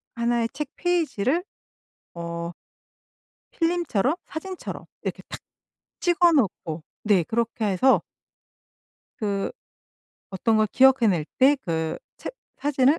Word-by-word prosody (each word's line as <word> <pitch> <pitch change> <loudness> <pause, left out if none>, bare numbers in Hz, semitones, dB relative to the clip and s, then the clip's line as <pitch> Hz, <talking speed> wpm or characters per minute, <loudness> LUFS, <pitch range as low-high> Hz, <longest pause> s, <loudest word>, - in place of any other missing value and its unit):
1 235 0 +1
의 - - +1
책 285 -1 -4
페이지를 335 - +1 0.7
어 170 0 -4 1.0
필름처럼 330 - +1
사진처럼 370 +3 -6 0.2
이렇게 - - -3
탁 - - -6 0.6
찍어 350 -1 +4
놓고 175 - 0 0.2
네 205 -4 +4
그렇게 230 +3 -1
해서 205 +7 +4 1.2
그 200 -2 -1 0.8
어떤 220 +4 +1
걸 215 0 +4
기억해 265 +1 +5
낼 170 -6 +1
때 275 +3 +6
그 160 -9 -2 0.2
책 - - -6 0.2
사진을 285 +2 +3
235 Hz, 200 characters per minute, -25 LUFS, 195-300 Hz, 1.2 s, 때